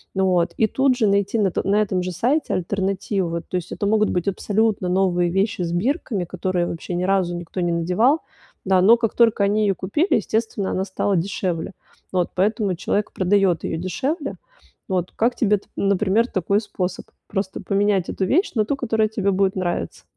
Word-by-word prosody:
Ну 190 0 +2
вот, 175 -2 +1
и 220 - +3
тут 265 +2 +2
же 225 -4 +2
найти 200 +2 +1
на 195 -3 +2
то - - -2
на 205 +2 +3
этом 185 -3 0
же 185 - -3
сайте 250 - 0
альтернативу. 190 0 -1
Вот, 170 0 -4
то - - -4
есть, 175 - -6
это - - -3
могут 215 0 +3
быть 180 +1 -1
абсолютно 205 0 0
новые 180 -1 +2
вещи 195 +1 0
с 170 - -2
бирками, 215 - -1
которые 180 0 -1
вообще 170 +1 -5
ни 175 - -1
разу 185 -2 +1
никто 175 +2 -5
не 175 - 0
надевал, 180 - +2 0.4
да, 185 -1 +3
но 225 +5 +7
как 230 -2 -1
только 225 -4 +4
они 210 +2 +1
её 200 -2 +2
купили, 295 - 0
естественно, 215 -1 -1
она 190 - -1
стала 195 +1 -1
дешевле. 175 -1 -2 0.4
Вот, 180 -2 0
поэтому 200 0 +1
человек 205 +4 -2
продаёт 190 -3 +2
её - - -2
дешевле. 275 - -2 0.6
Вот, 180 -2 -1
как 240 +2 +1
тебе 210 -3 +2
т 195 - -17
например, 200 +3 +2
такой 200 -1 0
способ: 180 -4 -4 0.2
просто 195 -1 -3
поменять 200 -2 +1
эту 190 - -1
вещь 340 - +1
на 215 - +2
ту, 280 - -1
которая 220 -5 +1
тебе 200 -2 0
будет 190 0 +1
нравиться? 175 -2 -3
195 Hz, 195 wpm, -22 LUFS, 180-215 Hz, 0.6 s, но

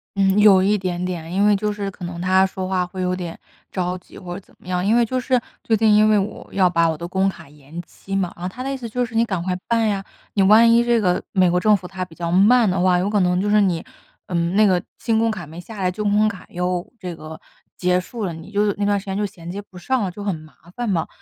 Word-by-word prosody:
嗯， 195 +1 +3
有 195 -3 +7
一 205 +2 +3
点 180 -2 -3
点， 170 -2 -5
因 200 +3 +2
为 210 - +5
就 210 +1 -1
是 200 -1 -4
可 180 - -12
能 170 0 -6
他 185 +2 +3
说 185 0 -4
话 185 -1 0
会 185 0 -6
有 180 0 0
点 175 -2 -6 0.3
着 180 -1 -2
急 - - -16
或 180 -2 -7
是 200 - -8
怎 - - -25
么 - - -19
样。 180 -1 -1
因 220 +3 +3
为 240 - +4
就 255 +3 -2
是， 255 0 +1 0.2
最 225 - +2
近 215 0 +4
因 215 +1 +5
为 210 - +4
我 200 +2 -3
要 190 -2 +4
把 170 -1 +2
我 160 - -2
的 170 +2 -6
工 190 +2 +1
卡 185 - -10
延 150 +3 -11
期 195 +3 -8
嘛， 185 -2 -1
然 - - -15
后 185 - -2
他 250 +6 -7
的 275 - -3
意 - - -3
思 240 -3 -7
就 245 +3 -1
是 235 - -12
你 225 +1 +3
赶 190 -6 -2
快 185 0 -1
办 230 -1 +2
呀， 195 -2 -1 0.3
你 200 - +2
万 220 +4 +6
一 235 +1 +5
这 240 -1 +2
个， 180 -3 +1
美 185 -3 +4
国 180 - +2
政 210 +1 +4
府 180 -1 -10
它 190 -1 -5
比 165 -3 -11
较 170 -1 -3
慢 215 +5 +5
的 185 0 0
话， 180 -1 +4
有 185 +3 0
可 210 - +1
能 180 -1 +2
就 200 - -1
是 210 0 +4
你， 180 -5 0 0.4
嗯， 170 0 -1
那 215 +1 +5
个 185 -3 +3 0.2
新 225 -1 0
工 230 0 +2
卡 200 -7 -4
没 160 +3 -10
下 220 +4 -11
来， 180 - +1
旧 210 +4 -4
工 210 +1 +3
卡 200 -3 -6
又 180 0 -3
这 180 -3 -6
个， 155 0 -10 0.4
结 180 0 +2
束 210 +5 -5
了， 175 - -3
你 165 +4 -10
就 205 -1 +1
那 205 - -2
段 205 -1 +2
时 - - -13
间 195 -1 -3
就 210 - -1
衔 175 -3 -6
接 200 - -5
不 200 -2 -16
上 255 +7 -1
了， 190 - -1
就 200 +3 -8
很 195 -4 -1
麻 155 0 -13 0.2
烦 240 -2 -2
嘛。 170 -5 0
190 Hz, 315 characters per minute, -21 LUFS, 180-210 Hz, 0.4 s, 有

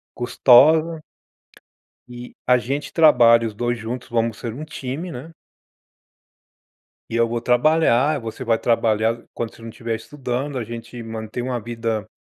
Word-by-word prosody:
custosa 155 +7 +4 1.1
eh, 120 0 -9
a 125 - +5
gente 135 +5 -4
trabalha, 120 -8 +5
os 110 - -5
2 120 +3 -1
juntos, 120 +3 -6
vamos 115 -2 -1
ser 115 - -5
um 150 +5 -7
time, 155 +3 -6
né 140 +5 -9 1.8
e - - -5
eu 115 0 +3
vou 115 0 -3
trabalhar, 145 +3 +3
você 115 +2 -7
vai 115 -2 +2
trabalhar, 115 -1 +1
quando 115 -1 -5
você 115 - -16
não 115 - -7
estiver 115 0 -4
estudando. 130 +2 -4
A 120 - -3
gente 115 +1 -8
mantém 110 +1 -6
uma 125 0 -2
vida 115 -2 -3
120 Hz, 150 wpm, -21 LUFS, 115-130 Hz, 1.8 s, a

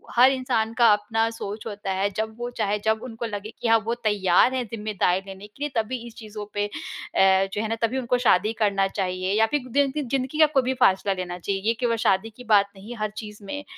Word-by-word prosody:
हर 255 +3 +7
इंसान 240 -4 -1
का 235 -2 +7
अपना 225 +2 0
सोच 215 -2 -6
होता 205 -2 -4
है 195 +2 0
जब 220 0 -2
वो 240 0 -3
चाहे, 205 +1 +1
जब 220 0 +2
उनको 235 -2 -6
लगे 210 -1 -5
कि - - 0
हाँ 225 0 +6
वो 230 +1 0
तैयार 205 +2 +3
है 260 -1 0
ज़िम्मेदारी 210 -4 -1
लेने 195 +1 -9
के 270 +7 -9
लिए। 295 - -1
तभी 250 +4 -4
इस 230 - -13
चीज़ों 215 -2 -8
पे 205 0 0
अ, 190 -1 +1
जो 210 - -1
है 220 - -2
ना 225 - 0
तभी 230 +3 +1
उनको 250 0 +1
शादी 205 +5 +4
करना 195 -2 +2
चाहिए 185 0 -2
या 225 - +6
फ़िर 255 -3 -2
दिनदि 285 +2 +1
ज़िंदगी 270 +3 -2
का 310 - +9
कोई 265 - +4
भी 260 +1 0
फ़ैसला 195 +1 +3
लेना 180 -1 -5
चाहिए। 195 +2 -2
ये 230 - +4
केवल 240 -2 +1
शादी 195 +3 +2
की 250 - -10
बात 200 0 +4
नहीं, 210 +5 -9
हर 215 -1 -1
चीज़ 210 -1 -8
में 290 +8 -5
215 Hz, 235 wpm, -24 LUFS, 200-240 Hz, -, का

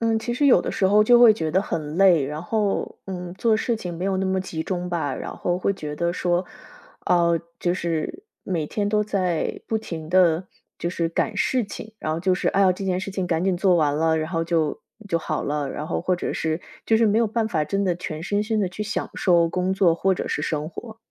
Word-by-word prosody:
嗯， 225 -1 +2
其 240 +2 -3
实 285 +3 +2
有 265 - +6
的 - - -3
时 190 - +2
候 210 +2 +5
就 240 +1 +6
会 235 -2 +9
觉 160 -7 -2
得 190 +5 +2
很 155 -4 -4
累， 180 -7 +5
然 150 +3 -5
后， 210 +1 -1
嗯， 180 -2 -5
做 220 +2 +2
事 235 +1 0
情 180 -5 -6
没 180 - -4
有 195 -1 0
那 190 - 0
么 190 0 0
集 160 -4 -4
中 180 0 -3
吧。 165 -6 -1
然 - - -6
后 175 0 -1
会 200 - +1
觉 150 -5 -6
得 170 +3 -1
说， 175 0 0 0.6
啊， 170 -1 +3 0.3
就 175 - +1
是， 170 - -3 0.2
每 165 -5 -2
天 205 +4 -2
都 210 0 +2
在 185 -5 -1
不 220 - 0
停 160 -7 -7
地 180 -1 +3 0.3
就 170 - -2
是 165 -2 -1
赶 165 - -1
事 255 -3 +1
情， 215 +2 -9
然 155 - -2
后 160 - -2
就 185 +1 +2
是， - - 0
哎 200 - +1
呀， 185 -2 +5
这 195 +2 -6
件 185 -1 0
事 195 - -5
情 190 -1 -2
赶 170 0 0
紧 190 -2 +1
做 185 -1 +3
完 150 -3 +2
了， 160 +1 +2
然 155 +1 -2
后 165 -2 0
就 165 -3 0 0.3
就 170 - +1
好 155 -1 -3
了， 145 -1 -2
然 150 - -5
后 - - -2
或 180 +1 0
者 - - -3
是 160 +1 -2 0.2
就 225 - +3
是 225 0 +4
没 210 +2 +3
有 235 - +3
办 220 +1 -1
法 155 -6 0
真 195 +6 -1
的 180 - +1
全 165 -2 -6
身 205 +3 0
心 215 0 0
地 190 - +1
去 185 +4 -5
享 205 -1 -3
受 170 -3 +3
工 180 +2 -1
作 190 -4 +3
或 190 +3 +1
者 - - -3
是 - - -2
生 155 -1 -2
活。 220 +5 -9
180 Hz, 270 characters per minute, -23 LUFS, 165-200 Hz, 0.6 s, 会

